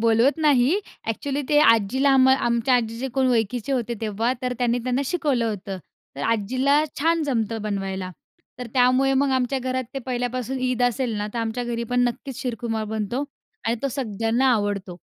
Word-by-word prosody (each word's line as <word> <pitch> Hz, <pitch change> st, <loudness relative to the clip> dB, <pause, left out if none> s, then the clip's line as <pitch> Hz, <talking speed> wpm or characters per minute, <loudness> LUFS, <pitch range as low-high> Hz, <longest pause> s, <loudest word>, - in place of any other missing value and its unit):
बोलवत 230 Hz, +5 st, +3 dB
नाही. 295 Hz, +3 st, +4 dB, 0.3 s
ॲक्चुअली 280 Hz, +5 st, -2 dB
ते 295 Hz, -, +4 dB
आजीला 230 Hz, +3 st, +4 dB
आम 260 Hz, 0 st, +6 dB
आमच्या 240 Hz, -1 st, +2 dB
आजीचे 235 Hz, +2 st, -1 dB
कोण 260 Hz, -1 st, +2 dB
ओळखीचे 240 Hz, +2 st, 0 dB
होते 240 Hz, -3 st, -1 dB
तेव्हा, 225 Hz, +3 st, 0 dB
तर 250 Hz, -, -1 dB
त्यांनी 245 Hz, 0 st, +1 dB
त्यांना 255 Hz, +2 st, 0 dB
शिकवलं 285 Hz, -7 st, 0 dB
होतं. 195 Hz, -2 st, -5 dB, 0.4 s
तर 140 Hz, -, -5 dB
आजीला 255 Hz, -, +2 dB, 0.2 s
छान 330 Hz, +2 st, +2 dB
जमतं 225 Hz, -6 st, -1 dB
बनवायला. 195 Hz, -3 st, -3 dB, 0.5 s
तर 250 Hz, -, -5 dB
त्यामुळे 255 Hz, +1 st, +4 dB
मग 275 Hz, +1 st, +2 dB
आमच्या 260 Hz, +1 st, +1 dB
घरात 255 Hz, 0 st, -2 dB
ते 270 Hz, -, -1 dB
पहिल्यापासून 250 Hz, +1 st, -2 dB
ईद 255 Hz, -1 st, 0 dB
असेल 245 Hz, -1 st, +1 dB
ना, 210 Hz, 0 st, -2 dB
तर -, -, -2 dB
आमच्या 230 Hz, +2 st, -2 dB
घरी 235 Hz, -1 st, -3 dB
पण 245 Hz, -, +2 dB
नक्कीच 245 Hz, +1 st, -4 dB
शीरखुर्मा 230 Hz, -3 st, -2 dB
बनतो 220 Hz, +5 st, -2 dB, 0.4 s
आणि 230 Hz, +1 st, +1 dB
तो 275 Hz, -, +1 dB
सगळ्यांना 230 Hz, 0 st, 0 dB
आवडतो. 200 Hz, -5 st, -2 dB
245 Hz, 170 wpm, -23 LUFS, 225-265 Hz, 0.5 s, आम